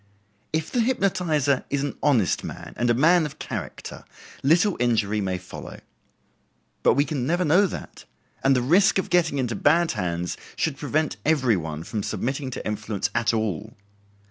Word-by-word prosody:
If 160 0 -2
the 245 - 0
hypnotizer 180 - +1
is 140 -1 -1
an 145 - -3
honest 120 - +2
man, - - -8
and 120 0 0
a 120 - +4
man 165 +6 +5
of 150 +1 -12
character, - - -6 0.4
little 170 +7 +3
injury 110 -4 +1
may 95 -2 -1
follow. 90 +1 -9 1.0
But - - +4
we 140 +2 +3
can 140 -6 -2
never 175 +3 +1
know 180 +7 +4
that, - - -8 0.4
and 135 0 +4
the 125 - +1
risk 180 +11 +4
of 190 - -2
getting 170 -5 +2
into 125 -4 -1
bad 165 +8 +3
hands 90 -3 -3 0.2
should 155 -4 -1
prevent 155 +1 -1
every 135 -7 +3
one 80 -3 -4
from 105 +3 -4
submitting 135 +6 -3
to 130 - -6
influence 105 -1 -2
at 120 -1 +2
all. 110 -1 -2
135 Hz, 170 wpm, -24 LUFS, 110-160 Hz, 1.0 s, man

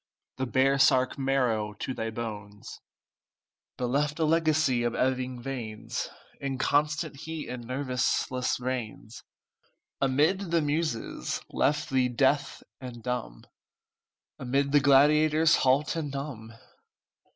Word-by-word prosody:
The 130 0 -2
baresark 130 0 +3
marrow 125 -6 0
to 130 - -5
thy 115 -2 -3
bones, 105 -3 -7 1.0
But 125 - -2
left 150 +3 0
a 160 - +1
legacy 155 -5 +2
of 120 -1 -1
ebbing 130 -1 -1
veins, 115 -5 -5 0.3
Inconstant 145 +2 0
heat 160 +2 -6
and 125 -2 -6
nerveless 130 -1 -1
reins, 120 -3 -5 0.8
Amid 155 +8 +2
the 170 -1 +2
Muses, 145 - -2
left 145 0 0
thee 130 -1 +2
deaf 135 +3 +1 0.2
and 120 -3 -9
dumb, 125 - -4 0.9
Amid 140 +2 0
the 145 - +6
gladiators, 150 +3 +5
halt 135 +5 +2
and 160 -3 -3
numb." 130 -6 -6
130 Hz, 110 wpm, -28 LUFS, 125-145 Hz, 1.0 s, the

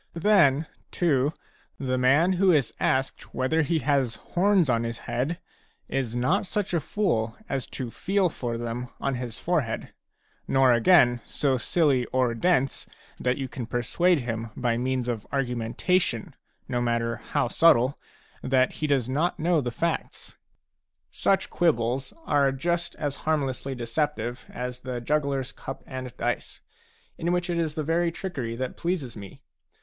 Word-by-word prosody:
Then, 165 -6 +4 0.2
too, 145 -5 +2 0.5
the 130 -2 -1
man 140 +8 +4
who 185 +1 +4
is 145 -8 +2
asked 130 +1 -1
whether 155 +5 +2
he 160 +2 +1
has 140 -6 +1
horns 190 -2 +2
on 115 -2 +2
his 115 0 -3
head 140 +8 -1 0.5
a - - -3
is 120 -3 -3
not 160 +12 +1
such 200 -1 -2
a 170 - +3
fool 130 - -1
as 135 -2 -2
to 125 -4 -5
feel 195 - +1
for 120 -7 -4
them 120 +1 -4
on 140 - -1
his 125 -3 -5
forehead, 155 -10 -1 0.5
nor 135 -2 +5
again 120 -1 +5
so 140 -3 +1
silly 135 -1 +2
or 125 -2 +1
dense 135 +1 +1 0.3
that 125 0 +1
you 135 -2 -3
can 125 -2 -6
persuade 145 +8 +2
him 115 -1 -3
by 120 -2 +1
means 130 0 -1
of 115 -4 -3
argumentation, 125 - 0 0.3
no 125 -2 -1
matter 115 -1 0
how - - -1
subtle, 130 -2 +4 0.4
that 130 0 +2
he 155 - -2
does 135 -5 +2
not 150 +7 0
know 165 0 +2
the 125 - -2
facts. 170 +8 -3 0.8
Such 195 - +1
quibbles 130 -5 +1
are 140 -2 +3
just 170 +5 -1
as 145 -2 -3
harmlessly 135 -3 -1
deceptive 120 0 -2
as 125 0 -5
the 125 -1 -4
jugglers 140 0 0
cup 135 - -8
and 130 -1 -6
dice, - - -2 0.6
in 170 +1 0
which 180 0 0
it 170 - 0
is 155 -2 -1
the 155 - -1
very 165 +2 +1
trickery 135 -11 -4
that 130 +1 -4
pleases 170 -9 -2
me. 100 -3 -11
135 Hz, 155 wpm, -26 LUFS, 120-165 Hz, 0.8 s, nor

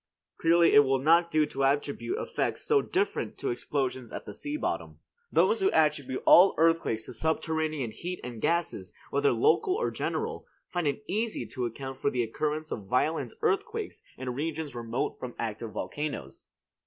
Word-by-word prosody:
Clearly 170 +1 +5
it - - +9
will 135 -1 +4
not 165 +5 +4
do 155 -2 +3
to 135 -1 -3
attribute 145 - 0
effects 475 - -2
so 435 -2 +4
different 395 +2 -1
to 405 - -2
explosions 130 - -2
at - - -6
the - - -7
sea 295 0 -4
bottom. - - -3 0.3
Those 455 0 +3
who 385 - +4
attribute 145 - +1
all 185 +3 +8
earthquakes 165 -9 +2
to - - -8
subterranean 155 -2 -1
heat 175 +11 -5
and 120 -3 -7
gases, 170 +1 -1 0.2
whether 425 0 +3
local 430 -3 +3
or 470 - -1
general, - - -3 0.3
find 175 -3 0
it 145 +10 -2
easy 220 +3 -1
to 125 -3 -3
account 135 +3 -7
for 140 - +1
the 125 -3 0
occurrence 150 +6 -2
of 100 -4 -5
violent 150 +7 0
earthquakes 440 0 -1 0.2
in 125 -1 -4
regions 155 +1 -3
remote 120 +1 -3
from 125 -1 -6
active 115 0 -4
volcanoes. 125 - -5
155 Hz, 165 wpm, -29 LUFS, 130-180 Hz, 0.3 s, it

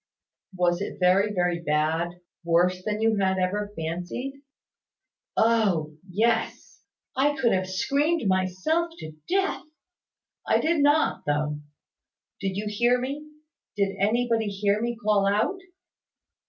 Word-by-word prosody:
"Was 175 0 +1
it - - -4
very, 190 +3 +3
very 175 -3 0
bad? 155 +2 +1 0.3
Worse 175 +2 +2
than 210 +1 -2
you 225 -1 +2
had 190 -1 +1
ever 205 +3 -1
fancied?" 175 +11 -4 1.0
"Oh! 200 -9 +2 0.2
Yes. 225 +4 -1 0.3
I 290 +2 +2
could 255 -4 +2
have 185 0 0
screamed 280 - +1
myself 185 - +1
to 155 - -8 0.2
death. 390 +1 +1 0.9
I - - +3
did 320 -1 +1
not, 290 +2 +2
though. 150 0 0 0.8
Did 195 -1 -3
you 210 - -3
hear 240 +4 +2
me, 285 +4 -5 0.5
did 200 -1 0
anybody 225 +2 +1
hear 200 +1 0
me 235 0 -2
call 210 -3 +2
out?" 215 - +1
205 Hz, 125 wpm, -26 LUFS, 180-240 Hz, 1.0 s, very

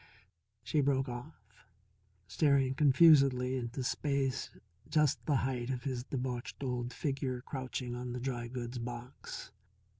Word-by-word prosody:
She 145 +6 +1
broke 135 -1 +2
off, 125 +5 -7 0.9
staring 135 - +3
confusedly 135 -3 +5
into 125 +1 -3
space 135 0 0 0.4
just 150 -3 +2
the 145 - +3
height 125 -2 -2
of 125 -2 -2
his 130 -3 -2
debauched 125 0 -4
old 125 -2 -2
figure 135 -3 -2
crouching 130 -3 -4
on 125 0 -4
the 125 - -3
dry 120 -2 -3
goods 120 0 -5
box. 120 0 -7
130 Hz, 125 wpm, -33 LUFS, 125-140 Hz, 0.9 s, confusedly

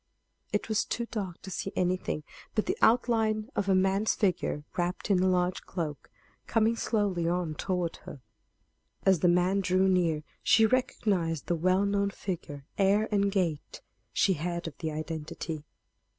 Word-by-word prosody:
It 210 - -1
was 220 -2 +1
too 235 - -3
dark 195 -6 -4
to 190 - -7
see 190 +2 -3
anything 180 -4 0 0.3
but 215 - +1
the - - 0
outline 225 -1 +3
of 200 - 0
a 190 - +5
man's 195 +3 +2
figure 180 -7 0
wrapped 180 +3 -1
in 185 -2 +4
a 190 - +3
large 180 0 +1
cloak, 155 -6 -5 0.4
coming 225 0 +2
slowly 205 -7 0
on 175 -2 -1
toward 180 +1 -2
her. 130 - -11 0.8
As 190 -3 +5
the 175 - +3
man 180 +3 +3
drew 185 +1 +2
near 170 -5 +2 0.2
she 225 - +5
recognized 200 - 0
the 175 - 0
well 185 +4 +2
known 200 0 +1
figure, 160 -8 -6
air 200 +3 +3
and 200 -1 +2
gait; 170 -7 -2 0.3
she 190 - +3
had 170 +1 -3
of 155 - -7
the 160 -2 -2
identity. 155 0 -5
185 Hz, 160 wpm, -29 LUFS, 170-200 Hz, 0.8 s, a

